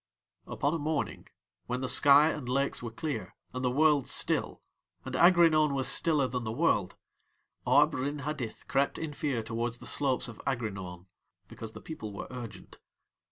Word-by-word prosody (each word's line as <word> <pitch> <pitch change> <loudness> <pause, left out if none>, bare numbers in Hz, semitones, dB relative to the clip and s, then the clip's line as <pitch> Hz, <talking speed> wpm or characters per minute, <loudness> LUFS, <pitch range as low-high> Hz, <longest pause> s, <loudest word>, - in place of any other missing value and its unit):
Upon 145 +2 -1
a 165 - -1
morning 145 - -3 0.4
when 125 +1 -2
the 130 - -2
sky 145 +4 +6
and 130 -5 -6
lakes 140 +2 0
were 120 - -5
clear 145 +6 -5 0.2
and 125 0 -4
the 125 - +2
world 145 0 +3
still, - - -1 0.4
and 130 - -6
Aghrinaun 165 -3 +5
was 135 -1 +2
stiller 150 -5 +3
than 125 -1 -3
the 110 - -3
world, 135 - +1 0.7
Arb - - +5
Rin 140 +3 -2
Hadith 145 -7 -5
crept 140 +1 +1
in 160 -2 -5
fear 140 -6 -2
towards 115 +1 -3
the - - -12
slopes 135 -3 +1
of 115 -3 -10
Aghrinaun 95 -8 -4 0.4
because 110 -1 -8
the - - -10
people 110 -10 -7
were 100 - -6
urgent. 120 -4 -9
130 Hz, 165 wpm, -30 LUFS, 115-150 Hz, 0.7 s, sky